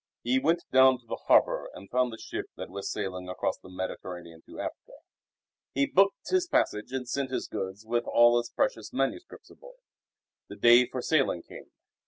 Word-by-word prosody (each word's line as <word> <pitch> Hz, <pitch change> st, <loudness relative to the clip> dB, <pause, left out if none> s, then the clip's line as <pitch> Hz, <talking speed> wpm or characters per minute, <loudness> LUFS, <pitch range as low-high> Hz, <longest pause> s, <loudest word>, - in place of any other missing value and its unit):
He 125 Hz, +2 st, +2 dB
went 165 Hz, +5 st, +1 dB
down 130 Hz, 0 st, +6 dB
to 120 Hz, -, -27 dB
the -, -, -5 dB
harbour -, -, +3 dB
and 100 Hz, -, -11 dB
found 125 Hz, 0 st, +1 dB
a 110 Hz, -, -8 dB
ship -, -, -6 dB
that -, -, -7 dB
was 100 Hz, +1 st, -5 dB
sailing 90 Hz, -3 st, -4 dB
across 90 Hz, -, -2 dB
the 95 Hz, -, -15 dB
Mediterranean 90 Hz, -2 st, -7 dB
to -, -, -11 dB
Africa. -, -, -7 dB, 0.8 s
He 140 Hz, +1 st, +3 dB
booked 195 Hz, +6 st, +2 dB
his 370 Hz, -1 st, +1 dB
passage 105 Hz, -, 0 dB
and 130 Hz, -2 st, -4 dB
sent 135 Hz, +1 st, -2 dB
his 130 Hz, -, -3 dB
goods 95 Hz, +3 st, -5 dB
with 120 Hz, +1 st, -1 dB
all 120 Hz, 0 st, +5 dB
his 120 Hz, -, -5 dB
precious 110 Hz, -, -1 dB
manuscripts 135 Hz, -, -3 dB
aboard. -, -, -15 dB, 0.7 s
The -, -, -9 dB
day 120 Hz, +1 st, +6 dB
for 125 Hz, -2 st, -5 dB
sailing 135 Hz, -, +1 dB
came. -, -, -12 dB
120 Hz, 185 wpm, -28 LUFS, 95-135 Hz, 0.8 s, down